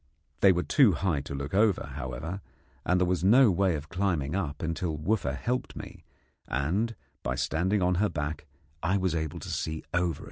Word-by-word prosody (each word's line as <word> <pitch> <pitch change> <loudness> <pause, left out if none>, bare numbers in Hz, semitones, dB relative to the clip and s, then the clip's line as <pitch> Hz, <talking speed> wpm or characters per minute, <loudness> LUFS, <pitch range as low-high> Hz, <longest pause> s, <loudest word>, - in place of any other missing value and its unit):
They 95 - +7
were 90 -1 +1
too 130 -10 +5
high 80 -3 0
to 70 0 -6
look 70 +3 -5
over, 105 -1 +2
however, 70 +10 -5 0.4
and 90 +1 +2
there 90 - +3
was 90 -1 0
no 115 +4 +6
way 95 -1 +2
of 75 0 -6
climbing 90 -6 0
up 80 -6 -2
until 80 -1 -2
Wooffa 75 -5 0
helped 125 +1 -2
me, - - -9 0.4
and 95 - 0 0.3
by 60 - -2
standing 90 +9 +1
on 90 +1 +3
her 105 - +3
back 75 0 -4 0.3
I 95 +4 +2
was 95 -3 0
able 80 -2 -2
to - - -7
see 80 0 -3
over. 85 -1 +1
90 Hz, 185 wpm, -28 LUFS, 75-95 Hz, 0.4 s, They